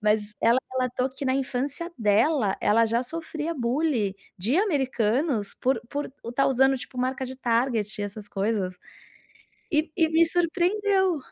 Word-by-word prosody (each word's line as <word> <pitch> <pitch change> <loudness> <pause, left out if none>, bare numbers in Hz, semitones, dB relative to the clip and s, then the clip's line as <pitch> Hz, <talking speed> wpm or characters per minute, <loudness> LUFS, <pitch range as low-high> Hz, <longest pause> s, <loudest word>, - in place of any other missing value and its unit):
mas 210 0 +3 0.2
ela 230 +2 +4
relatou 255 0 0
que 270 +2 -7
na 260 0 +2
infância 275 +6 -2
dela, 220 +1 +2
ela 230 +2 +4
já 230 +2 +1
sofria 325 +3 -4
bullying 245 -5 0 0.3
de 225 - +1
americanos 265 - 0
por 255 -2 +1
por 290 +2 -4
estar 245 +4 +1
usando 265 +1 +3
tipo 250 0 -8
marca 260 +1 -1
de 260 +1 -7
Target 230 -4 0
e - - -1
essas 205 0 -8
coisas 195 -2 -1 1.0
e 310 0 +1
e 325 -2 +3
me 325 +1 +5
surpreendeu. 365 +2 +1
260 Hz, 150 wpm, -26 LUFS, 225-310 Hz, 1.0 s, me